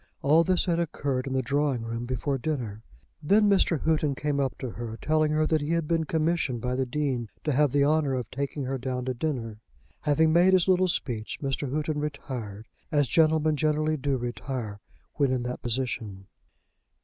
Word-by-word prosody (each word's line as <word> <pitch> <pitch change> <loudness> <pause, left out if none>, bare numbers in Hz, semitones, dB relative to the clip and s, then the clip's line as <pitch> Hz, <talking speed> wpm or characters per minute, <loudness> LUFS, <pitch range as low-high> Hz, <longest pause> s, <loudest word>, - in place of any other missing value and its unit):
All 155 +4 +5
this 185 +1 +2
had 170 -2 +1
occurred 140 -5 -2
in 135 - -3
the 130 0 +1
drawing 140 -2 0
room 115 +1 -4
before 135 +2 -1
dinner. 120 -8 -3 0.4
Then 205 +7 +4
Mr. 190 -5 +3
Houghton 155 -3 +1
came 145 0 -1
up 135 -2 -1
to 130 - -5
her, 115 -1 -6
telling 155 0 +1
that 155 -1 +1
he 150 +3 -1
had 165 -2 0
been 165 -1 +1
commissioned 160 -5 0
by 125 +2 -2
the 130 0 -1
Dean 130 -4 -1
to 150 - 0
have 145 0 +3
the 140 0 +3
honour 150 -2 +2
of 125 -3 -4
taking 140 +1 -3
her 130 +1 -2
down 125 0 -3
to 130 - -1
dinner. 120 -6 -3 0.4
Having 155 +2 +3
made 180 +3 +5
his 185 -1 +4
little 185 0 +4
speech, 120 -10 -2
Mr. 135 0 -2
Houghton 150 +1 -1
retired, 125 -8 -5 0.2
as 145 -3 +3
gentlemen 155 0 +3
generally 155 +1 +1
do 140 -2 -1
retire 120 -3 -4 0.4
when 140 -3 +2
in 125 -2 0
that 125 +1 -4
position. 115 -5 -3
140 Hz, 185 wpm, -27 LUFS, 125-155 Hz, 0.4 s, All